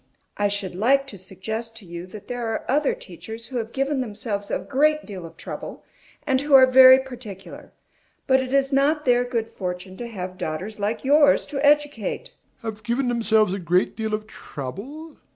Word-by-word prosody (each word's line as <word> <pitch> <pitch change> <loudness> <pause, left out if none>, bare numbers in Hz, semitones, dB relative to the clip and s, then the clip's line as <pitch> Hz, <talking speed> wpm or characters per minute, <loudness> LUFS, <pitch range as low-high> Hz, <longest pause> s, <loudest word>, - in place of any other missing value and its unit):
I 205 - +1
should 200 -2 -3
like 265 +9 +3
to 225 -7 -9
suggest 220 +5 -6
to 225 - -10
you 170 +1 -8
that 205 +2 -11
there 245 -2 -3
are 225 - -3
other 300 - +2
teachers 230 - -9
who 255 +1 -5
have 225 -1 -3
given 275 +1 0
themselves 210 -3 -4
a - - 0
great 305 +3 +1
deal 185 -5 -7
of - - -17
trouble, - - -7 0.4
and 265 -2 +2
who 290 -1 +4
are 260 -1 +9
very 260 0 +9
particular; 245 -7 -8 0.5
but 265 0 +4
it 255 -1 -5
is 275 0 +2
not 295 +3 +2
their 245 -1 +4
good 235 -3 -2
fortune 185 -2 -6
to 240 - -5
have 185 -5 -7
daughters 185 +8 -4
like 210 +5 -2
yours 285 +1 +5
to 285 -1 -4
educate. 290 -8 +1
DOMINIE. - - -39
Have 215 - -22
given 245 +3 0
themselves 220 -4 +2
a 200 - -3
great 180 +1 +1
deal 220 -1 -1
of 215 0 -7
trouble? 220 - -8
230 Hz, 190 wpm, -23 LUFS, 200-270 Hz, 0.5 s, are